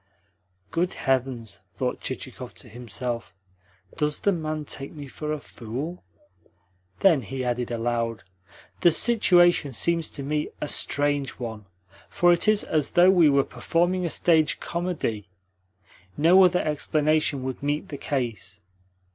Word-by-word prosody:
"Good 175 +6 -1
heavens!" 130 -5 -2 0.2
thought 125 -1 -2
Chichikov 130 -1 -7
to - - -8
himself. 120 -2 -5 0.6
"Does 150 -1 -1
the 200 - +3
man 155 -3 -3
take 135 0 -4
me 145 -3 -9
for 150 +3 -5
a 155 - -2
fool?" 135 +8 -7 1.0
Then 170 -8 +5
he 130 +4 -5
added 120 0 -1
aloud: 115 -1 -2 0.6
"The 175 - +5
situation 175 - +4
seems 165 +5 0
to 140 - -7
me 150 +2 -1
a 150 - -3
strange 145 -1 +1
one, 110 -4 -6 0.4
for 175 0 +4
it 175 - 0
is 215 -1 +4
as 150 -3 0
though 180 +1 +6
we 175 -5 +5
were 140 -1 +4
performing 175 +9 0
a 170 - -1
stage 160 -2 +2
comedy. 165 - -3 0.9
No 175 +5 +6
other 180 0 +2
explanation 155 -1 0
would 130 -1 -5
meet 145 +1 -2
the 145 - -6
case. 115 -9 -4
145 Hz, 140 wpm, -25 LUFS, 125-170 Hz, 1.0 s, though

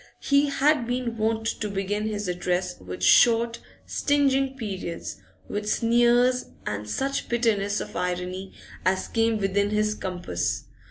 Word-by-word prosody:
He 280 +1 +4
had 280 -2 +2
been 245 -1 -2
wont 225 0 0 0.2
to 210 - -1
begin 200 +2 -2
his 210 -2 -3
address 180 0 -1
with 90 0 -7
short, 235 0 +5 0.3
stinging 270 -2 +1
periods, 190 -7 -5 0.3
with 210 0 -3
sneers 240 +2 +3 0.2
and 105 0 -4
such 275 - -2
bitterness 215 -4 +1
of - - -7
irony 180 +2 -3 0.3
as 185 0 +1
came 225 -1 +1
within 200 0 +1
his 210 0 +1
compass. 180 - -3
215 Hz, 130 wpm, -25 LUFS, 185-240 Hz, 0.3 s, short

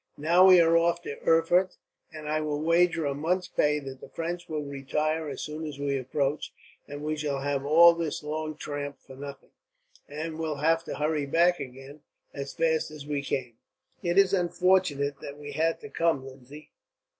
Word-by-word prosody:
Now 170 +5 +5
we 185 -1 +8
are 165 0 +5
off 170 +1 +2
to 140 - -7
Erfurt, 175 +3 +3 0.3
and 155 -1 -8
I 155 +1 0
will 150 -1 -2
wager 165 0 +2
a 140 - 0
month's 175 +6 -1
pay 150 0 +1
that 135 -1 -9
the - - -11
French 170 +1 -5
will 155 -2 -2
retire, 150 +3 -2
as 135 - -5
soon 155 +1 -6
as 150 -3 -6
we 140 -1 -1
approach; 135 +2 -2 0.4
and 145 0 -7
we 155 0 -1
shall 145 -2 -2
have 140 -1 -1
all 170 +3 +8
this 165 -3 -3
long 155 0 -4
tramp 145 -2 -5
for 130 - -14
nothing, 140 0 -9 0.6
and 155 +2 -5
will 160 -2 -2
have 165 +3 +2
to - - -5
hurry 150 -1 -1
back 170 +4 +3
again, 135 +2 -9 0.3
as 140 0 -5
fast 160 -1 +1
as 150 -2 -10
we 145 -1 -2
came." 125 -4 -4 0.4
"It 175 +1 -1
is 195 -1 +5
unfortunate 175 -6 +1
that 140 0 -8
we 145 0 -8
had 160 +3 0
to 215 - -9
come, 165 -5 +1
Lindsay. 135 +3 -12
150 Hz, 190 wpm, -27 LUFS, 140-165 Hz, 0.6 s, we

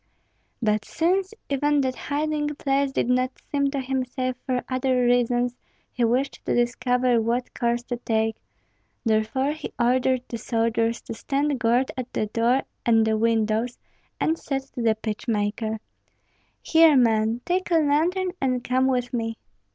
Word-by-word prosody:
But 215 -1 +2
since 370 - 0 0.2
even 290 +1 +2
that 260 -1 -1
hiding 295 0 -2
place 275 -1 0
did 265 - 0
not 255 +1 +1
seem 280 -1 +1
to 275 0 -2
him 265 0 -1
safe 255 0 -3
for 250 -1 0
other 255 -1 +1
reasons, 245 0 +2 0.4
he 245 - -1
wished 250 +4 0
to - - +1
discover 245 0 +2
what 240 +3 -1
course 235 0 0
to 245 0 -4
take; 220 -1 0 0.7
therefore 225 +5 +1
he 310 - -6
ordered 250 +1 +2
the 235 - -5
soldiers 230 0 0
to - - -7
stand 275 +4 -1
guard 240 +3 +2
at 255 -1 -5
the - - 0
door 235 +5 +1 0.2
and 225 -1 +4
the 220 0 +2
windows, 225 +1 +1 0.4
and 325 +1 +1
said 270 -2 -3
to 245 - -4
the 225 -1 +3
pitch 220 +2 -5
maker, 215 0 -1 0.9
"Here, 320 -3 +6
man, 225 -1 +2
take 365 +1 0
a 340 - +3
lantern 330 +5 +2
and 255 -2 0
come 255 +1 +2
with 250 -2 0
me." 225 -2 -2
250 Hz, 160 wpm, -24 LUFS, 230-275 Hz, 0.9 s, Here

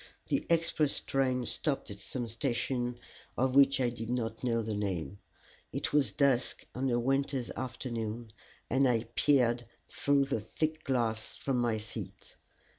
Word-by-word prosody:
The - - 0
express 165 -3 +2
train 130 -2 0
stopped 135 -2 -1
at 100 - -8
some 120 +4 -3
station 120 +1 -1 0.4
of 130 +1 +2
which 140 0 +6
I 125 -2 +3
did 115 -1 -6
not 115 -2 -2
know 115 -2 +1
the 110 0 -2
name. 100 -2 -2 0.5
It - - -2
was 145 -2 +3
dusk 135 -3 +2
on 130 +1 0
a 120 -1 +2
winter's 135 0 0
afternoon, 120 -3 -4 0.4
and 135 +2 +3
I 115 -3 +2
peered 120 -5 +3 0.2
through 140 -1 +2
the 135 -4 -1
thick 155 +9 -2
glass 115 -4 0
from 135 -2 -1
my 120 -2 +2
seat. 110 +1 -8
125 Hz, 150 wpm, -32 LUFS, 115-135 Hz, 0.5 s, which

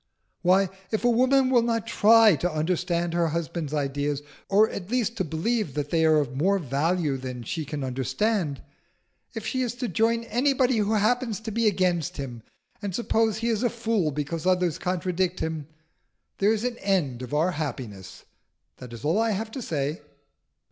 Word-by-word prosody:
"Why, 190 +1 +4 0.2
if 220 - -2
a - - +5
woman 260 +2 +3
will 245 -2 +5
not 230 -1 0
try 225 -2 +6
to 175 +6 -1
understand 170 +2 -1
her 170 -1 +2
husband's 165 -1 -3
ideas, 145 0 -1 0.3
or 210 +2 +5
at 195 -3 -7
least 235 -2 0
to 190 - +1
believe 165 - -1
that 145 -1 -3
they 165 -1 +2
are 155 -1 +5
of 135 -4 -1
more 190 +8 +2
value 155 0 0
than 125 -2 -6
she 155 +7 -4
can 145 -1 -4
understand 140 - -1 0.7
if 225 -1 -5
she 260 +3 -1
is 245 -2 -2
to 245 0 -3
join 230 +1 +1
anybody 250 +1 +2
who 210 0 +1
happens 220 0 +1
to 220 0 -5
be 230 +1 +1
against 180 -6 +1
him, 125 -5 -6 0.4
and 200 -4 -3
suppose 225 -2 +1
he 230 +1 -1
is 225 -2 0
a 245 - +2
fool 225 -8 0
because 150 +4 -3
others 180 -3 +2
contradict 180 0 -1
him 160 -3 -3 0.7
there 200 +2 +4
is 220 0 0
an 245 -1 -2
end 165 -11 0
of 125 +3 -4
our 165 +5 +2
happiness. 130 - -6 0.5
That 125 -2 -10
is 115 +5 -8
all 165 +8 +2
I 225 0 +2
have 220 +3 -4
to 260 - -5
say." 150 - -2
180 Hz, 180 wpm, -26 LUFS, 150-225 Hz, 0.7 s, try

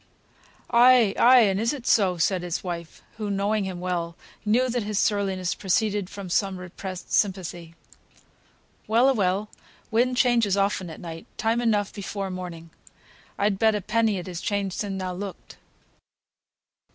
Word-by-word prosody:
"Ay, 240 -3 +6
ay, 250 +1 +7
and 195 -3 +2
is 230 +4 +1
it 265 -4 -8
so?" 190 -7 +3
said 170 +3 +1
his 175 -1 -4
wife, 170 -3 -6
who, 210 -2 -3
knowing 200 +1 0
him 185 -2 -5
well, 175 -2 -3 0.3
knew 235 +4 +2
that 245 -1 -1
his 210 -1 -3
surliness 195 -4 0
proceeded 200 0 0
from 200 -2 -8
some 190 +1 0
repressed 180 0 -8
sympathy. 175 -4 -1 1.1
"Well 230 +4 +4
a - - +4
well, 200 -1 0 0.4
wind 245 +3 +2
changes 235 -6 +3
often 195 -2 0
at 160 - -9
night. 165 -1 -8
Time 225 +2 +1
enough 210 -4 +1
before 195 -1 -5
morning. 170 -3 -7 0.7
I'd 200 -1 +1
bet 220 -1 +4
a 210 - -2
penny 220 0 +1
it 180 - -5
has 180 -2 -6
changed 200 -3 -2
sin' 200 -2 -3
thou 185 -1 -3
looked." 195 +1 -8
200 Hz, 155 wpm, -25 LUFS, 180-220 Hz, 1.1 s, ay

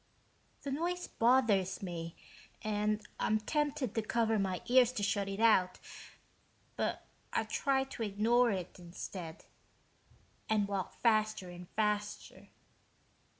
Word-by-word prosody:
The 280 - -3
noise 350 +5 -2
bothers 225 -6 +2
me 170 -2 -5 0.5
and 210 0 0
I'm 215 0 +2
tempted 290 0 -1
to 225 - 0
cover 225 0 +1
my 190 -2 -1
ears 250 -1 +5
to 205 - -2
shut 200 0 +1
it 195 +1 -4
out, 205 -5 +4 1.0
but - - -2 0.3
I - - +1
try 270 -2 +1
to 270 -3 -8
ignore 225 +4 +3
it, 185 -3 -4
instead, 170 -1 -7 1.0
and 210 -2 +2
walk 195 -2 -3
faster 215 -5 +2
and 175 0 -10
faster. 210 -1 -2
215 Hz, 120 wpm, -33 LUFS, 195-240 Hz, 1.0 s, ears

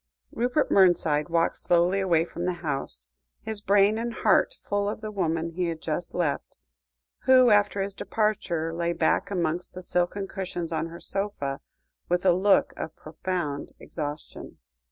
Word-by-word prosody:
Rupert 245 +6 0
Mernside 170 -5 +4
walked 165 0 +1
slowly 175 +3 +2
away 170 -4 +2
from 170 0 -5
the 180 - +1
house, 100 - -3 0.3
his 220 -2 -3
brain 205 +2 +4
and 235 +1 -2
heart - - +3
full 205 0 0
of 210 - -4
the 215 -1 -5
woman 165 -4 -1
he 175 +1 -1
had 165 -1 -3
just 160 +2 -4
left, 165 -6 -2 0.7
who, 255 -2 +7
after 205 -1 +3
his 200 0 -4
departure, 190 -7 -1
lay 170 0 -1
back 170 - +1
amongst 175 -2 -2
the 185 - -7
silken 180 +3 -1
cushions 175 -4 -4
on 160 - -1
her 170 +1 -10
sofa, 195 -9 -3 0.5
with 180 +1 +1
a 180 - +6
look 195 +3 +3
of 160 - -5
profound 155 -2 -4
exhaustion. 150 -1 -7
175 Hz, 155 wpm, -26 LUFS, 165-200 Hz, 0.7 s, who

